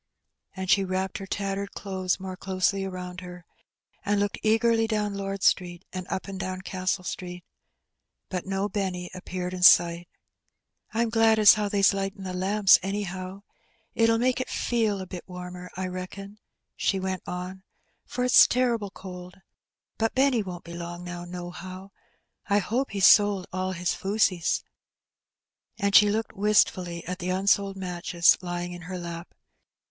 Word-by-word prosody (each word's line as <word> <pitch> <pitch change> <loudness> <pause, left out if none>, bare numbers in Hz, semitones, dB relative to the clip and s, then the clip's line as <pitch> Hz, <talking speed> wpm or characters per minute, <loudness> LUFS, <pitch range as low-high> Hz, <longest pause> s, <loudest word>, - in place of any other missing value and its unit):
And 190 -1 -4
she 195 +1 +4
wrapped 190 0 -2
her 195 - -7
tattered 200 0 -3
clothes 190 -2 -2
more 185 -1 -6
closely 190 +1 0
around 180 -1 -6
her, 180 -1 -10 0.6
and 205 -1 +1
looked 205 0 -1
eagerly 225 +1 +3
down 210 -2 -1
Lord 195 -1 -4
Street 175 0 +1
and 185 -1 -5
up 190 - -3
and 195 -1 -6
down 185 -1 -4
Castle 185 0 -2
Street. 180 0 -6 0.8
But 185 0 -4
no 195 +1 -1
Benny 185 -4 -3
appeared 180 0 -5
in 180 - -5
sight. 170 -1 +6 0.4
" - - -49
Pm 230 0 0
glad 225 -1 +4
as 210 -2 +9
how 210 -1 -1
they's 200 0 +4
lightin' 195 0 -3
the 185 -1 -5
lamps, 195 +2 +4
anyhow. 190 0 -4 0.5
It'll 230 0 +3
make 255 +2 +1
it - - -5
feel 220 -5 0
a - - -5
bit 180 -1 -8
warmer, 180 0 -8
I 190 - -2
reckon/' 185 +3 -7 0.4
she 195 - 0
went 185 -1 -3
on, 180 +1 -5 0.4
"for 250 - -3
it's 250 - +7
terrible 235 -5 0
cold. 180 -1 -10 0.6
But 225 0 0
Benny 265 -3 +3
won't 180 -3 -7
be 170 - -10
long 175 +1 -6
now, 175 0 -6
nohow. 180 +2 -8 0.6
I 200 - +4
hope 235 +7 0
he's 195 -2 +2
sold 205 -3 +6
all 185 0 -2
his 180 0 -1
fusees." 190 -4 +1 1.1
And 200 -2 0
she 210 0 +8
looked 220 +1 -2
wistfully 185 -4 +1
at 180 +1 -5
the 180 0 -3
unsold 195 +1 +1
matches 175 -2 +2
lying 175 0 -4
in 175 - -9
her 185 - -4
lap. 170 0 -7
190 Hz, 160 wpm, -26 LUFS, 180-205 Hz, 1.1 s, as